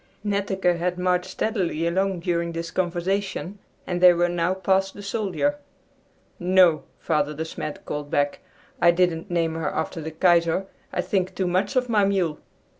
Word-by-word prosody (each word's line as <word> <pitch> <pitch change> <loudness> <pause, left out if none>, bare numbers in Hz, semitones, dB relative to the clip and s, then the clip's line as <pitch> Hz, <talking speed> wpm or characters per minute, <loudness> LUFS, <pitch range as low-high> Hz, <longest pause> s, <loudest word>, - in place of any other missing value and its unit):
Netteke 195 -3 0
had 180 +1 -1
marched 180 0 0
steadily 185 -7 -1
along 190 +1 0
during 170 -1 -1
this 165 0 -4
conversation, 190 +2 -2 0.3
and 180 -1 -2
they 180 -1 +9
were 175 0 +2
now 175 +1 0
past 190 +1 +1
the 205 - -9
soldier. 225 +8 -1 0.8
"No," 180 -3 +4
Father 150 -2 0
De 160 +2 -3
Smet 155 -1 -6
called 145 0 -4
back, 145 0 0 0.4
"I 175 - +6
didn't 170 +1 +1
name 165 -2 0
her 160 -2 -2
after 160 +1 -3
the 160 - -4
Kaiser. 170 +2 +2 0.3
I - - 0
think 190 -2 -1
too 190 - -1
much 185 +5 0
of 250 -1 +2
my 215 -4 +3
mule!" 185 -6 0
180 Hz, 165 wpm, -24 LUFS, 165-190 Hz, 0.8 s, they